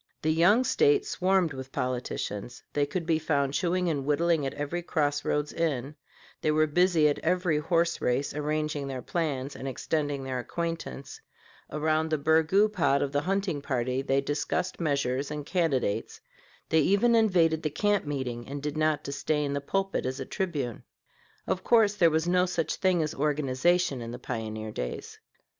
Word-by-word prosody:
The 155 0 +2
young 190 +10 +5
State 430 - +3
swarmed 185 - +1
with 130 0 -8
politicians; 125 -2 -4
they 145 -1 +1
could 170 +3 -3
be 160 -1 +2
found 140 -3 0
chewing 180 +4 0
and 145 -5 -1
whittling 150 +1 +1
at - - -4
every 145 +4 -3
cross 145 -4 0
roads 150 0 -1
inn; 145 -4 -1 0.5
they - - +1
were 155 0 +4
busy 165 0 +3
at 145 - 0
every 175 -2 +1
horse 170 +1 +1
race, 125 +3 0
arranging 150 -1 -2
their 130 -2 -5
plans 145 -5 -2
and 135 - -6
extending 145 +1 -2
their 130 -1 -3
acquaintance; 165 -2 -5 0.5
around 155 +1 0
the 155 - +1
burgoo 160 +7 +3
pot 165 -9 +2
of 140 - -2
the 145 0 +1
hunting 190 -3 -1
party 130 -2 -1
they 135 0 +1
discussed 150 +6 -2
measures 140 -4 0
and 150 -1 -5
candidates; 145 - -1 0.5
they 160 - +4
even 200 +9 +3
invaded 175 -8 +3
the 155 - -1
camp 205 +6 +1
meeting 130 -5 -4
and 140 +1 -6
did 150 0 -3
not 155 -1 +1
disdain 145 +1 -1
the 140 - -2
pulpit 195 0 -1
as 130 +1 -4
a 135 - -4
tribune. 145 - -3 0.6
Of 185 - -2
course 220 -4 +4
there 180 -5 +4
was 160 +1 0
no 180 +1 +3
such 170 -2 -1
thing 185 -4 +2
as 155 - -3
organization 150 +1 +1
in 115 - -6
the 120 - -6
pioneer 110 -3 -5
days. 60 -9 -6
150 Hz, 170 wpm, -28 LUFS, 140-175 Hz, 0.6 s, young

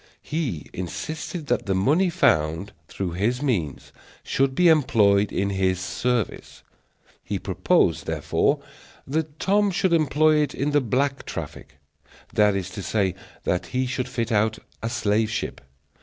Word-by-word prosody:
He 145 - -3
insisted 155 - -5
that 125 -5 -1
the 95 - +1
money 150 - +3
found 80 - +1 0.2
through 95 -3 -4
his 115 +10 -1
means 90 - -2 0.3
should 135 0 +1
be 180 +3 +4
employed 105 -10 +4
in 100 +1 0
his 95 -1 +1
service. 105 +5 -2 0.6
He - - -3
proposed, - - +1
therefore, - - 0 0.4
that 155 +1 -2
Tom 200 +4 +2
should 185 -1 +1
employ 155 0 +4
it 150 -3 0
in 145 +2 -1
the 145 0 +3
black 135 +3 0
traffic; - - -7 0.6
that 105 -1 +4
is 95 -1 -3
to 100 - -6
say, 95 -1 0 0.3
that 90 - -1
he 130 0 -1
should 130 0 -3
fit 120 -1 -2
out 110 0 +2 0.2
a 115 - -2
slave 110 -2 +1
ship. 110 - -4
120 Hz, 145 wpm, -24 LUFS, 100-145 Hz, 0.6 s, be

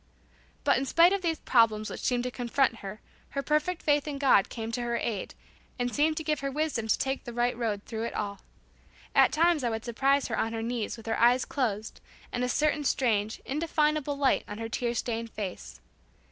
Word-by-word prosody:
But 280 -3 +3
in 270 - -2
spite 340 +6 +5
of 395 - 0
these 330 -3 0
problems 215 -3 +3
which - - -6
seemed 245 -1 +1
to 250 - -3
confront 245 0 +1
her, 205 +1 -8 0.4
her 275 - 0
perfect 305 +4 0
faith 290 -1 +2
in 290 -2 -3
God 270 -8 +4
came 225 -1 -5
to 245 +1 -2
her 235 0 -1
aid, 220 -4 -3 0.4
and 245 -1 -1
seemed 310 +1 +2
to 320 - -2
give 305 -2 0
her 275 - -2
wisdom 285 -6 -1
to - - +3
take 270 0 -2
the 240 - -7
right 240 +1 +1
road 220 -4 -2
through 225 0 -4
it - - -5
all. 200 -1 -3 0.7
At - - +5
times 330 -2 +3
I 240 - +1
would 225 0 -4
surprise 270 +4 +2
her 230 - -2
on 225 - -1
her 225 0 -3
knees 235 -1 -3
with 225 - -12
her 225 - -1
eyes 245 +2 +4
closed 220 -6 -2 0.3
and 245 - -2
a 250 - 0
certain 300 +3 +1
strange 220 -6 0
indefinable 300 -1 0
light 275 -2 +2
on 205 - -6
her 225 0 -5
tear 240 +1 -1
stained 230 -1 -2
face. 200 -5 -6
245 Hz, 215 wpm, -28 LUFS, 225-290 Hz, 0.7 s, spite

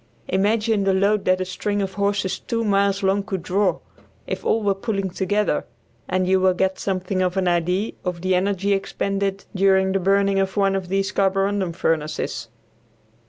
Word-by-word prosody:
Imagine 210 +2 +1
the 195 -1 +2
load 200 +2 +2
that 185 0 +2
a - - -1
string 205 +3 -2
of 195 -1 -2
horses 200 -1 -1
two 230 0 -2
miles 200 -1 +1
long 195 +1 +2
could 195 -4 -4
draw, 190 +1 +1 0.5
if - - -4
all 225 - +1
were 200 -1 +3
pulling 195 -2 -3
together, 200 -2 0 0.5
and 185 0 +1
you 190 0 +3
will 185 -1 +3
get 190 +1 0
something 185 -1 -1
of 180 +1 0
an 185 -1 +1
idea 180 +4 +1
of 180 -2 -3
the 185 +1 +1
energy 195 +2 +1
expended 195 0 -2
during 190 0 +3
the 195 - +1
burning 195 +1 +2
of 195 +1 -1
one 195 -1 +3
of 190 -2 -3
these 195 +1 0
carborundum 195 -1 +1
furnaces. 155 -2 -2
195 Hz, 175 wpm, -22 LUFS, 185-200 Hz, 0.5 s, were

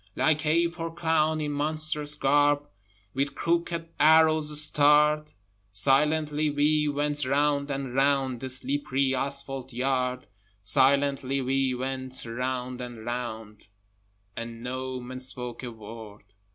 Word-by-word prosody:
Like 155 -1 +1
ape 170 +2 +1
or 165 0 -3
clown, 160 -2 +1
in 150 -1 -2
monstrous 150 0 -1
garb 145 0 +2 0.5
With 140 +1 -2
crooked 170 0 -1
arrows 155 -1 +5
starred, 150 +1 +4 0.4
Silently 150 +7 +2
we 150 +1 +2
went 145 0 -1
round 140 +1 +1
and 135 -2 -4
round 135 -2 +1
The 130 - -5
slippery 135 +1 -1
asphalte 135 -1 -3
yard; 125 0 -1 0.4
Silently 135 +4 +2
we 135 0 0
went 130 0 -4
round 125 +1 -4
and 120 -3 -8
round, 110 -4 -6 0.7
And 115 0 -7
no 130 +1 -4
man 130 +1 -8
spoke 125 -2 -3
a 125 - -5
word. 110 -1 -11
140 Hz, 120 wpm, -27 LUFS, 125-150 Hz, 0.7 s, arrows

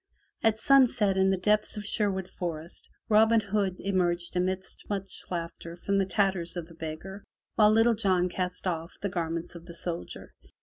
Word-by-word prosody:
At 225 -1 +3
sunset 245 -6 +4
in 190 0 +3
the 190 - +2
depths 210 +3 +1
of 210 - -5
Sherwood 195 -3 0
Forest, 170 -3 -6 0.2
Robin 220 +1 +5
Hood 200 -2 -1
emerged 175 -3 0
amidst 185 +1 -2
much 195 -2 -4
laugher 170 -1 -5
from 200 +3 0
the 195 - +1
tatters 190 -4 +1
of 170 - -4
the 165 - -15
beggar, 165 +5 -7 0.3
while 210 -1 +5
Little 225 +2 +5
John 190 -5 +2
cast 180 +1 -3
off 170 -1 -2
the 200 - 0
garments 170 -2 -3
of 170 0 -11
the 170 - -9
soldier. 170 0 -6
190 Hz, 170 wpm, -28 LUFS, 175-205 Hz, 0.3 s, Robin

